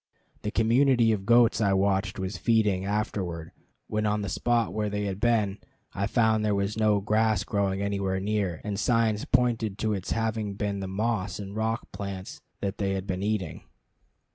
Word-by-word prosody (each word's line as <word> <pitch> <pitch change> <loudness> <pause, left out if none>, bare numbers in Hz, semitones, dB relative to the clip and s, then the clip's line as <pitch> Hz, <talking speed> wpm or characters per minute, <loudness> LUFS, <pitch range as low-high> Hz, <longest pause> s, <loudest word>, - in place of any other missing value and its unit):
The 105 - -2
community 115 +1 +3
of 100 -2 -2
goats 120 -1 +5
I 100 -2 +3
watched 95 0 +1
was 95 0 -3
feeding; 105 -3 +2
afterward, 95 -5 -2 0.3
when 105 0 -1
on 105 0 0
the 100 - -3
spot 115 +5 +1
where 105 -1 -1
they 105 0 -2
had 100 -1 -3
been, 110 -4 +1 0.3
I 100 +1 -1
found 110 -1 +2
there 105 -1 +2
was 100 +1 -1
no 105 -2 +2
grass 110 -1 +2
growing 100 -1 -1
anywhere 100 -2 -1
near, 100 -4 -1
and 105 -1 -3
signs 115 -2 +1
pointed 120 -5 +1
to 110 0 0
its 95 -2 -4
having 110 -2 -1
been 100 0 -2
the 95 - -4
moss 100 -1 -1
and 100 0 -7
rock 110 +1 -2
plants 100 -2 -6 0.2
that 100 0 -3
they 95 -1 0
had 95 -1 -4
been 95 -1 -3
eating. 100 -6 -2
105 Hz, 180 wpm, -27 LUFS, 95-110 Hz, 0.3 s, goats